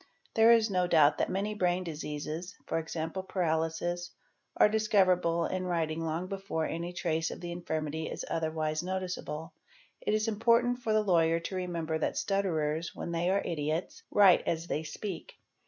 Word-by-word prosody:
There 225 +1 +6
is 225 -2 +5
no 180 -1 +2
doubt 155 -4 +5
_ - - -21
that - - +1
many 200 +3 -1
brain 185 -2 +1
diseases 155 +2 -5 0.2
(e.g., 160 0 -2 0.2
paralysis) 175 0 -1 0.5
are - - +7
discoverable 185 -6 +2
in 185 +1 -2
writing 165 -2 -1
long 165 +2 -2
before 190 -4 -3
any 170 +2 -3
trace 165 -2 -1
of - - -7
the 175 -1 -5
infirmity 160 -2 -3
is - - -5
otherwise 155 -1 -1
noticeable. 180 -3 -4 0.5
It 210 - +1
is 215 +1 0
important 235 +3 +3
for 230 -3 -2
the 215 0 +3
lawyer 165 -4 +3
to 190 - -5
remember 170 -3 -2
that - - -1
stutterers, 165 -5 -1
when - - -5
they 170 +1 0
are 200 +1 +2
idiots, 155 +1 -2
write 195 -4 +6
as 165 0 -1
they 155 - -2
speak. 165 +4 -6
175 Hz, 165 wpm, -30 LUFS, 160-190 Hz, 0.5 s, are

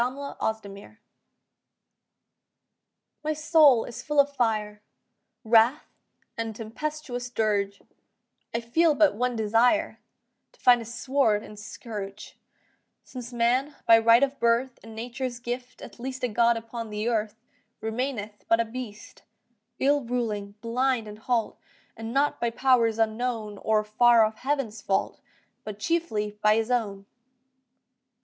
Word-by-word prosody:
WRATHS 250 -4 -3 2.6
My 310 +1 0
soul 300 -5 +5
is 240 - -8
full 295 -1 0
of 285 0 +4
fire, 215 -4 -1 0.6
Wrath 230 +5 +3 0.4
and 225 -1 -4
tempestuous 245 +2 -5
dirge; 205 -4 0 0.7
I 230 - -2
feel 305 +7 +2
but 300 -2 +4
one 245 +3 -1
desire, 230 +7 +2 0.5
To - - -26
find 245 -1 +5
a - - -7
sword 240 -2 0
and 210 - -11
scourge: 210 -2 -8 0.6
Since 250 -2 -9
man, 250 +5 +1
by 225 0 +7
right 230 +3 +5
of 275 0 -1
birth 235 +2 +1
And 225 -1 -12
nature's 245 +2 -4
gift 245 +1 -6
at - - -11
least 260 +1 -6
A - - +3
god 235 +1 +3
upon 230 0 -6
the 210 +1 -3
earth, 220 -3 -1 0.4
Remaineth 220 -2 -4
but 225 - +3
a 230 - +2
beast, 225 -2 -9 0.6
Ill 285 +2 +2
ruling, 220 -4 -3
blind 240 0 0
and 210 0 -10
halt, 235 -1 -1 0.4
And 225 0 -6
not 280 +3 +1
by 235 - +1
powers' 235 -2 +2
unknown, 220 -2 -1
Or 215 -1 +1
far 230 +2 +5
off 215 0 -4
Heaven's, 260 -6 -2
fault, 195 - -1 0.4
But 210 -2 -7
chiefly 210 -8 -2
by 215 0 +5
his 225 +2 -1
own. 205 -5 -1
235 Hz, 130 wpm, -26 LUFS, 220-255 Hz, 2.6 s, by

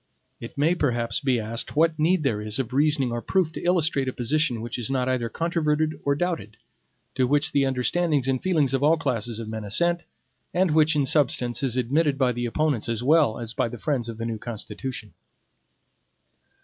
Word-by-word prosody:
It 115 - -9
may 155 +5 +3
perhaps 120 -8 0
be 130 -4 +1
asked 115 +4 -4
what 160 0 +2
need 165 +2 +2
there 110 -7 0
is 105 0 -2
of 130 -2 -3
reasoning 140 -2 +2
or 120 0 -3
proof 185 +1 +1
to - - -7
illustrate 160 -6 +1
a 130 - -2
position 130 0 0
which 120 +2 -5
is 120 - -4
not 130 -2 0
either 125 -3 0
controverted 155 -1 -1
or 140 0 +1
doubted, 145 - -3 0.6
to 130 -2 +1
which 145 +2 +1
the 140 -1 +2
understandings 135 +2 0
and 130 -1 0
feelings 155 -8 +1
of 135 - +1
all 155 +3 +4
classes 120 -7 -2
of 115 - -6
men 110 0 -5
assent, 170 +12 +1 0.5
and 180 -1 +3
which 155 0 +4
in 145 -2 +2
substance 125 -4 +1
is 130 -3 0
admitted 140 +4 +1
by 130 -2 +2
the 120 0 -3
opponents 140 -3 0
as 115 0 -2
well 145 -4 +3
as 115 -1 -4
by - - 0
the 120 - -7
friends 125 -4 -1
of 115 - -6
the 115 - -4
new 115 -2 -3
Constitution. 110 0 -6
135 Hz, 200 wpm, -25 LUFS, 120-155 Hz, 0.6 s, all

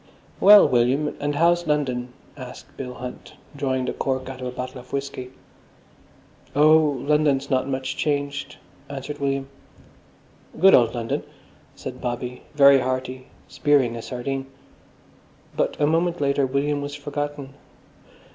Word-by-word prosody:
"Well, 205 0 +8
William, 130 +3 +1
and 145 0 -1
how's 170 +2 +3
London?" 130 -5 -1 0.2
asked 130 -2 -11
Bill 125 -2 -6
Hunt, 125 0 -9 0.2
drawing 130 -2 -1
the - - -2
cork 130 -1 -2
out 130 -1 -8
of 125 - -3
a - - -4
bottle 125 +1 -6
of 125 - -20
whisky. 140 -2 -4 1.3
"Oh, 155 +2 +6 0.3
London's 145 -2 +2
not 130 0 +1
much 130 0 -3
changed," 145 0 -2 0.3
answered 140 +1 -6
William. 135 -1 -1 1.1
"Good 190 +3 +7
old 120 -1 +5
London," 120 +5 -2 0.5
said 130 -2 -8
Bobby, 125 0 -4
very 140 -1 +7
hearty, 130 0 -3 0.2
spearing 135 -5 +2
a 115 - -5
sardine. 135 +3 -4 1.1
But - - -1
a 145 - +3
moment 170 +3 +1
later 140 -1 +1
William 145 +2 0
was 145 0 -5
forgotten. 145 -1 -5
135 Hz, 135 wpm, -23 LUFS, 130-145 Hz, 1.3 s, Well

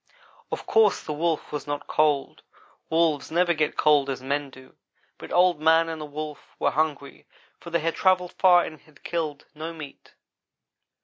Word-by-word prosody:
Of - - -4
course 220 -3 +3
the 155 - -4
Wolf 160 +1 -1
was 150 0 -5
not 145 0 -4
cold; 150 -3 0 0.5
wolves 160 -3 +1
never 175 +1 +2
get 155 -2 -1
cold 145 -2 +4
as 135 - -3
men 140 +2 -2
do. 130 0 -16 0.4
Both - - -10
Old 175 -3 +3
man 160 +1 +4
and 160 -1 -5
the - - -5
Wolf 150 0 -8
were - - +1
hungry 150 -2 -2 0.3
for 170 - -10
they 170 0 0
had 165 +1 0
travelled 185 -2 +2
far 180 -2 +5
and 155 - -9
had 155 -2 -23
killed 155 -4 -3
no 160 +2 -6
meat. 150 -4 -11
155 Hz, 175 wpm, -25 LUFS, 145-170 Hz, 0.5 s, far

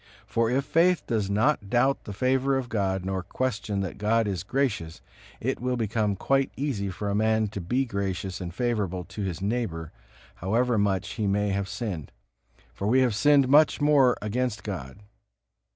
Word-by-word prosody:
For 115 0 +1
if 135 +3 +1
faith 170 +2 +3
does 105 -4 -1
not 105 +1 +1
doubt 130 +4 +2
the - - -6
favor 130 +5 +1
of 130 -2 -4
God 95 -4 -1
nor 95 -1 -1
question 105 0 -2
that 95 -1 -5
God 110 +1 +2
is 95 -4 -2
gracious, 100 -8 -2 0.4
it - - -2
will 125 0 0
become 110 -2 0
quite 135 +7 +1
easy 125 -9 -2
for 100 +2 -5
a 100 - 0
man 110 0 +2
to 100 -2 -5
be 125 +10 0
gracious 100 -3 -3
and 85 -1 -4
favorable 100 -4 -1
to 95 +4 -7
his 95 -2 -3
neighbor, 100 -8 -2 0.5
however 115 +5 +1
much 100 -1 +1
he 105 -1 -2
may 100 +1 +1
have 100 -1 -1
sinned; 100 - -4 0.6
for 100 - -3
we 130 +4 +4
have 125 -3 +2
sinned 140 +4 +4
much 150 +3 +5
more 145 -4 +4
against 115 +1 -2
God. 70 -11 -6
105 Hz, 175 wpm, -26 LUFS, 95-125 Hz, 0.6 s, much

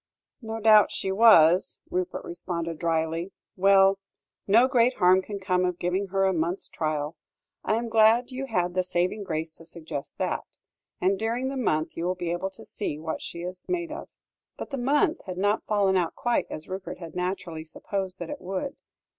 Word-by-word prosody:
"No 225 -1 -5
doubt 215 -2 +6
she 190 - -2
was," 190 -5 +6
Rupert 180 0 -2
responded 170 -2 -4
drily; 165 +2 -1 0.2
"well! 195 0 +5 0.5
no 230 +6 +6
great 250 0 +3
harm 185 0 +5
can 200 +1 -6
come 185 -1 +1
of 180 -1 0
giving 185 +3 -1
her 195 +1 +1
a 190 - +2
month's 170 +2 -1
trial. 155 0 -2 0.5
I 215 - +1
am 235 +1 -2
glad 225 +3 +4
you 265 +1 -4
had 180 -6 0
the 185 - +2
saving 180 +3 -1
grace 160 -3 -3
to 165 - -14
suggest 155 -5 -6
that. - - -1 0.6
And 190 +1 +1
during 235 +4 -1
the 275 - -4
month 155 -12 0
you 165 - -3
will 180 +1 0
be 175 -2 -3
able 175 +3 -2
to 190 - -14
see 175 -8 -3
what 160 +1 -4
she 170 - -6
is 180 +1 -6
made 345 -3 -1
of." 315 - -7 0.5
But - - -7
the 275 - -2
month 290 +6 +2
had 185 -1 -6
not 205 +3 +1
fallen 200 -3 +2
out 175 -3 0
quite 240 -1 0
as 155 - -6
Rupert 190 0 -6
had 165 -2 -9
naturally 180 -3 -3
supposed 190 +4 -4
that 175 -2 -6
it - - -6
would. 190 +9 -4
185 Hz, 190 wpm, -26 LUFS, 170-215 Hz, 0.6 s, doubt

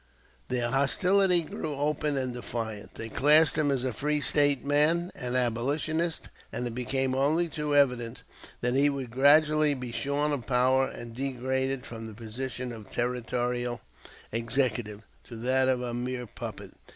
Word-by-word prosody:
Their 120 -1 -1
hostility 180 +6 +3
grew 150 -1 -5
open 145 0 -1
and 130 -2 -2
defiant; 115 -3 -5
they 115 - -6
classed 150 +7 +6
him 155 -2 +1
as 135 -3 0
a 130 -2 -1
free 150 +5 0
State 145 -2 +3
man, 155 +5 +2
an 125 -2 -4
"abolitionist," 145 +7 -1 0.2
and 125 - -3
it 120 - -4
became 130 +2 -1
only 150 +6 +1
too 150 -2 -2
evident 125 -5 +1 0.4
that 125 0 0
he 140 +2 +4
would 135 -4 -5
gradually 150 +3 +4
be 125 -2 -6
shorn 145 +4 -1
of 135 -5 -4
power 130 +1 +3
and 120 -1 -9
degraded 130 0 -2
from 115 -1 -8
the 110 - -10
position 125 +3 -5
of 110 -3 -11
Territorial 120 0 -2 0.5
Executive 115 -2 -1 0.2
to 120 - -10
that 130 +3 +2
of 125 -1 0
a 120 -1 -4
mere 125 +1 -3
puppet. 105 - -8
130 Hz, 155 wpm, -28 LUFS, 120-145 Hz, 0.5 s, classed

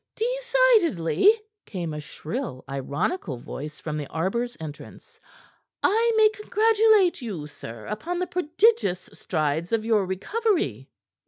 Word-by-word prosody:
"Decidedly," 455 - +3 0.4
came 175 -6 -4
a 150 - -5
shrill, 155 - -6
ironical 140 - -2
voice 150 +5 -8
from 155 -1 -4
the 145 -2 -4
arbor's 235 +9 -2
entrance, 155 -2 -10 0.6
"I 460 +3 +3
may 435 -1 +7
congratulate 425 -3 +3
you, 195 -11 -5
sir, 115 -6 -10
upon 320 +12 -4
the 365 - 0
prodigious 355 - +1
strides 155 0 -2
of 225 -1 0
your 215 -4 +2
recovery." 405 - -1
230 Hz, 115 wpm, -25 LUFS, -, 0.6 s, may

